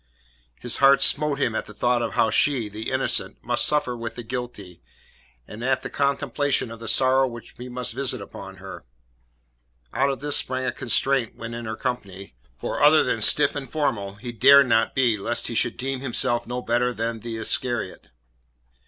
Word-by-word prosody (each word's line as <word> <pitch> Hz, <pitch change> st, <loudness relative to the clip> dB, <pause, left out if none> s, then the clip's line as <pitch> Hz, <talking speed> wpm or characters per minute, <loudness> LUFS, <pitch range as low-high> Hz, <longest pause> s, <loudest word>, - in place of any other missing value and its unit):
His 120 Hz, -, -2 dB
heart 140 Hz, 0 st, +5 dB
smote 150 Hz, -1 st, +3 dB
him 125 Hz, -5 st, 0 dB
at -, -, -3 dB
the 105 Hz, -, -13 dB
thought 120 Hz, 0 st, +1 dB
of 115 Hz, -, -3 dB
how 110 Hz, -, +2 dB
she 130 Hz, -7 st, +1 dB
the 110 Hz, +2 st, -6 dB
innocent -, -, 0 dB
must -, -, +2 dB
suffer 150 Hz, -5 st, +1 dB
with 115 Hz, -1 st, -6 dB
the 120 Hz, -, -7 dB
guilty, 110 Hz, -, -7 dB, 0.7 s
and 110 Hz, +3 st, -9 dB
at 130 Hz, 0 st, 0 dB
the -, -, -6 dB
contemplation 140 Hz, -2 st, 0 dB
of 115 Hz, -, -9 dB
the 115 Hz, -, -8 dB
sorrow 130 Hz, +3 st, +3 dB
which 120 Hz, -2 st, -10 dB
he 125 Hz, +1 st, -8 dB
must 125 Hz, -1 st, -4 dB
visit 130 Hz, -1 st, -2 dB
upon 100 Hz, -, -10 dB
her. -, -, -10 dB, 1.1 s
Out 135 Hz, +2 st, +2 dB
of 135 Hz, -3 st, -3 dB
this 145 Hz, 0 st, +3 dB
sprang 130 Hz, 0 st, -1 dB
a -, -, 0 dB
constraint 130 Hz, +1 st, 0 dB
when 115 Hz, 0 st, -7 dB
in 120 Hz, 0 st, -6 dB
her 110 Hz, 0 st, -4 dB
company, 100 Hz, -, -5 dB, 0.2 s
for -, -, -4 dB
other 150 Hz, +2 st, +6 dB
than 115 Hz, -3 st, -1 dB
stiff 145 Hz, +7 st, +4 dB
and 135 Hz, -4 st, -6 dB
formal 115 Hz, -11 st, -2 dB
he 120 Hz, +4 st, -7 dB
dared 140 Hz, +5 st, +6 dB
not 115 Hz, -2 st, +2 dB
be 120 Hz, -5 st, +2 dB
lest 115 Hz, +4 st, -1 dB
he -, -, -3 dB
should 115 Hz, 0 st, 0 dB
deem 135 Hz, +1 st, -3 dB
himself 120 Hz, -2 st, -1 dB
no 125 Hz, +1 st, -4 dB
better 120 Hz, +1 st, +1 dB
than 115 Hz, 0 st, -3 dB
the 115 Hz, 0 st, -6 dB
Iscariot. 110 Hz, -2 st, -2 dB
120 Hz, 190 wpm, -24 LUFS, 115-135 Hz, 1.1 s, other